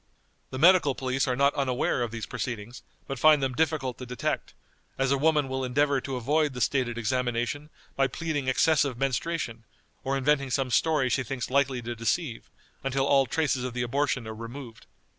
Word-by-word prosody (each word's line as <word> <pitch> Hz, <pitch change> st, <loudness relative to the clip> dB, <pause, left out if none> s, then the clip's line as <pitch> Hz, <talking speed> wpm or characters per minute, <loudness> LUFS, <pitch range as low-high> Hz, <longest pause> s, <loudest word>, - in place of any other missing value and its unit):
The 130 Hz, -, -6 dB
medical 165 Hz, -3 st, +5 dB
police 130 Hz, +1 st, -1 dB
are 125 Hz, -, +1 dB
not 140 Hz, +2 st, +3 dB
unaware 130 Hz, -3 st, 0 dB
of 120 Hz, -, -1 dB
these 115 Hz, -1 st, -5 dB
proceedings, 120 Hz, -1 st, -5 dB, 0.2 s
but 135 Hz, -2 st, -5 dB
find 155 Hz, +1 st, +6 dB
them 130 Hz, -1 st, 0 dB
difficult 150 Hz, -4 st, -1 dB
to 125 Hz, -, -6 dB
detect, 125 Hz, 0 st, -3 dB, 0.4 s
as 135 Hz, 0 st, +1 dB
a 140 Hz, -, +3 dB
woman 150 Hz, -1 st, +3 dB
will 130 Hz, 0 st, -3 dB
endeavor 140 Hz, +2 st, +1 dB
to 135 Hz, 0 st, -4 dB
avoid 145 Hz, +4 st, +1 dB
the -, -, -4 dB
stated 125 Hz, -1 st, 0 dB
examination 120 Hz, +4 st, -1 dB, 0.3 s
by 135 Hz, 0 st, +3 dB
pleading 150 Hz, -3 st, -3 dB
excessive 140 Hz, -1 st, +2 dB
menstruation, 135 Hz, -2 st, -2 dB, 0.4 s
or 135 Hz, 0 st, 0 dB
inventing 140 Hz, 0 st, +1 dB
some 130 Hz, 0 st, -1 dB
story 155 Hz, -1 st, +2 dB
she 130 Hz, -, +1 dB
thinks 125 Hz, 0 st, -4 dB
likely 135 Hz, -2 st, +1 dB
to 120 Hz, +1 st, -4 dB
deceive, 115 Hz, +3 st, -2 dB, 0.3 s
until 135 Hz, 0 st, 0 dB
all 135 Hz, -1 st, +4 dB
traces 135 Hz, -2 st, 0 dB
of 125 Hz, -1 st, -4 dB
the 120 Hz, -, 0 dB
abortion 130 Hz, -1 st, -1 dB
are 110 Hz, -, -5 dB
removed. 115 Hz, +1 st, -9 dB
135 Hz, 180 wpm, -27 LUFS, 125-145 Hz, 0.4 s, find